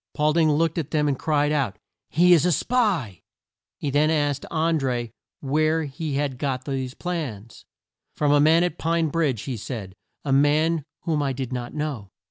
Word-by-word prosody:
Paul 150 Hz, 0 st, +2 dB
ding 160 Hz, -1 st, +3 dB
looked 165 Hz, +2 st, +1 dB
at 155 Hz, -2 st, -4 dB
them 150 Hz, -2 st, +1 dB
and 145 Hz, -, +2 dB
cried 150 Hz, -1 st, +1 dB
out, 135 Hz, -10 st, 0 dB, 0.3 s
"He 175 Hz, +3 st, +5 dB
is 160 Hz, -4 st, +5 dB
a 180 Hz, -, +3 dB
spy!" 180 Hz, -, 0 dB, 0.6 s
He 145 Hz, -, -3 dB
then 150 Hz, +2 st, +3 dB
asked 145 Hz, -3 st, 0 dB
An 160 Hz, 0 st, +1 dB
dré 120 Hz, -4 st, -2 dB, 0.3 s
where 155 Hz, +3 st, +1 dB
he 150 Hz, 0 st, -4 dB
had 140 Hz, -3 st, -2 dB
got 130 Hz, -3 st, -2 dB
these 130 Hz, -2 st, -3 dB
plans. 130 Hz, -, -5 dB, 0.5 s
"From 145 Hz, -1 st, +1 dB
a 145 Hz, -, +5 dB
man 160 Hz, +3 st, +5 dB
at 175 Hz, -2 st, -2 dB
Pine 165 Hz, -1 st, +1 dB
Bridge" 145 Hz, -8 st, 0 dB
he 130 Hz, -4 st, -4 dB
said; 105 Hz, -4 st, -6 dB, 0.3 s
"a 135 Hz, -, +1 dB
man 150 Hz, +2 st, +3 dB, 0.2 s
whom 155 Hz, -3 st, 0 dB
I 140 Hz, -2 st, 0 dB
did 130 Hz, -1 st, -5 dB
not 120 Hz, +2 st, -5 dB
know." 145 Hz, -10 st, -4 dB
145 Hz, 185 wpm, -24 LUFS, 135-160 Hz, 0.6 s, He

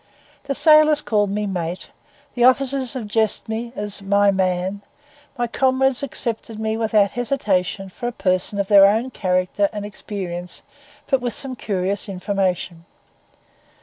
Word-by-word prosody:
The 275 Hz, -, -2 dB
sailors 305 Hz, -1 st, +6 dB
called 210 Hz, -7 st, 0 dB
me 210 Hz, +1 st, -2 dB
'mate,' 180 Hz, -2 st, -4 dB, 0.4 s
the 245 Hz, -, 0 dB
officers 265 Hz, 0 st, +2 dB
addressed 220 Hz, -2 st, 0 dB
me 225 Hz, +2 st, -4 dB
as 205 Hz, 0 st, -1 dB
'my 200 Hz, +1 st, +3 dB
man,' 190 Hz, +1 st, -1 dB, 0.6 s
my 240 Hz, -, 0 dB
comrades 260 Hz, +1 st, +1 dB
accepted 230 Hz, -4 st, -4 dB
me 220 Hz, 0 st, -1 dB
without 215 Hz, -3 st, +2 dB
hesitation 205 Hz, -7 st, -1 dB
for 215 Hz, +6 st, -6 dB
a -, -, -2 dB
person 185 Hz, -2 st, -1 dB
of 200 Hz, -, 0 dB
their 195 Hz, -1 st, +7 dB
own 225 Hz, +6 st, 0 dB
character 185 Hz, 0 st, 0 dB
and 210 Hz, -1 st, -5 dB
experience, 185 Hz, -4 st, -6 dB, 0.4 s
but 270 Hz, -2 st, +1 dB
with 245 Hz, -3 st, -2 dB
some 265 Hz, -2 st, -3 dB
curious 200 Hz, -1 st, -2 dB
information. 185 Hz, -3 st, -2 dB
210 Hz, 140 wpm, -21 LUFS, 195-245 Hz, 0.6 s, their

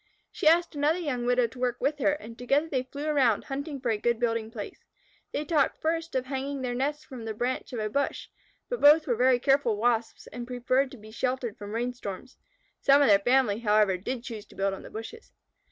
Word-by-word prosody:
She -, -, -1 dB
asked 340 Hz, +2 st, +4 dB
another 295 Hz, +3 st, +1 dB
young 270 Hz, -8 st, -2 dB
widow 245 Hz, 0 st, +3 dB
to 235 Hz, +2 st, -8 dB
work 245 Hz, -1 st, -1 dB
with 290 Hz, +3 st, 0 dB
her, 290 Hz, +2 st, +3 dB
and 235 Hz, -7 st, -8 dB
together 275 Hz, +6 st, +1 dB
they 270 Hz, -5 st, 0 dB
flew 280 Hz, +3 st, -7 dB
around 270 Hz, -8 st, +2 dB
hunting 280 Hz, +1 st, -5 dB
for 250 Hz, -3 st, -1 dB
a 215 Hz, -, -1 dB
good 235 Hz, +1 st, +1 dB
building 230 Hz, -2 st, 0 dB
place. 220 Hz, -3 st, -8 dB, 0.5 s
They 295 Hz, -, -2 dB
talked 300 Hz, -3 st, +1 dB
first 330 Hz, 0 st, -2 dB
of 260 Hz, -1 st, 0 dB
hanging 270 Hz, 0 st, -4 dB
their 245 Hz, -1 st, -2 dB
nest 290 Hz, +4 st, -2 dB
from 255 Hz, -5 st, -9 dB
the 220 Hz, -1 st, -4 dB
branch 250 Hz, +4 st, -2 dB
of 245 Hz, -, -5 dB
a 215 Hz, -, -1 dB
bush, 280 Hz, +6 st, -2 dB, 0.4 s
but -, -, -4 dB
both 300 Hz, +2 st, +7 dB
were 245 Hz, -, +1 dB
very 250 Hz, +2 st, +4 dB
careful 260 Hz, -4 st, +2 dB
Wasps 230 Hz, 0 st, 0 dB
and 240 Hz, +1 st, -8 dB
preferred 255 Hz, +2 st, +1 dB
to 260 Hz, -, -11 dB
be 215 Hz, 0 st, -13 dB
sheltered 250 Hz, -1 st, -2 dB
from 205 Hz, -1 st, -8 dB
rain 245 Hz, +2 st, -1 dB
storms. 245 Hz, 0 st, -8 dB, 0.4 s
(Some 280 Hz, +1 st, +5 dB
of 275 Hz, -, +4 dB
their 200 Hz, -1 st, +7 dB
family, 245 Hz, -1 st, +2 dB
however, 210 Hz, -3 st, +3 dB
did 235 Hz, +7 st, -4 dB
choose 220 Hz, -4 st, -7 dB
to -, -, -17 dB
build 195 Hz, 0 st, 0 dB
on 195 Hz, -, -9 dB
bushes). 225 Hz, -, -9 dB
250 Hz, 220 wpm, -28 LUFS, 230-285 Hz, 0.5 s, both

